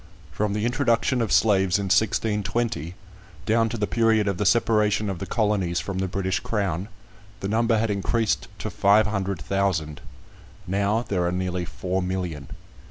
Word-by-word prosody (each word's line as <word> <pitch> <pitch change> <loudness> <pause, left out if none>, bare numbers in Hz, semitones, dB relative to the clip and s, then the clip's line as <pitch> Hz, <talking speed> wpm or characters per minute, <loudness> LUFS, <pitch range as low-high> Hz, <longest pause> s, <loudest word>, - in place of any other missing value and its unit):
From 100 +9 -1
the 105 +1 -1
introduction 120 +1 +1
of 115 - -1
slaves 95 -4 +3
in 100 - -2
1620, 105 -2 0 0.5
down 115 +1 +2
to 115 - -4
the 105 - 0
period 110 -2 +2
of 100 -3 -1
the 105 - +2
separation 105 -3 +2
of 90 - -6
the - - -5
Colonies 100 -6 0
from 95 +3 -4
the 95 - 0
British 95 +1 -1
Crown, 100 -4 -2 0.5
the 95 - -3
number 115 +2 +2
had 110 0 0
increased 105 +2 0
to - - -5
five 105 +2 +4
hundred 100 -3 -2
thousand; 85 -3 -1 0.6
now 100 +4 0
there 90 -3 0
are 85 - 0
nearly 90 -1 -2
four 95 +2 -3
million. 90 -5 -4
100 Hz, 165 wpm, -24 LUFS, 95-110 Hz, 0.6 s, five